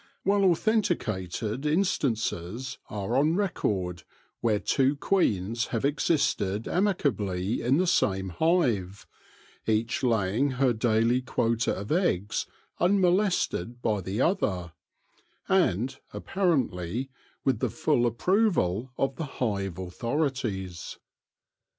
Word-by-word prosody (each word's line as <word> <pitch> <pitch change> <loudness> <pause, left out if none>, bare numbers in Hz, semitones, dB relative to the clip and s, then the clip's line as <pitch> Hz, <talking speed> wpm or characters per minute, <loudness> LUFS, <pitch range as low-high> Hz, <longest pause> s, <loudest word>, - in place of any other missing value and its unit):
Well 200 +1 +3
authenticated 135 - 0
in 155 +6 +3
stances 115 - -2
are 105 +3 -3
on 150 +5 +3
record 95 - -1 0.4
where 110 -3 +2
two 135 +6 +2
queens 115 - 0
have 115 +2 -2
existed 135 - +1
amicably 115 - 0
in 130 +4 +2
the 185 - +2
same 95 - +1
hive, 110 - +1 0.6
each 110 +1 +1
laying 115 +3 +1
her 130 -2 +3
daily 115 +2 +2
quota 115 -2 0
of 100 +2 -6
eggs 110 - 0 0.3
unmolested 180 - +1
by 105 -3 +1
the 95 +6 -2
other, 95 - 0 0.7
and, 135 - +2 0.2
appa 195 - -7
rently, 125 - 0 0.4
with 130 -5 +2
the - - 0
full 150 -6 +1
approval 130 - +1
of 135 -1 -1
the 160 - -3
hive 100 -7 -1
authorities. 100 - -3
120 Hz, 105 wpm, -27 LUFS, 100-160 Hz, 0.7 s, Well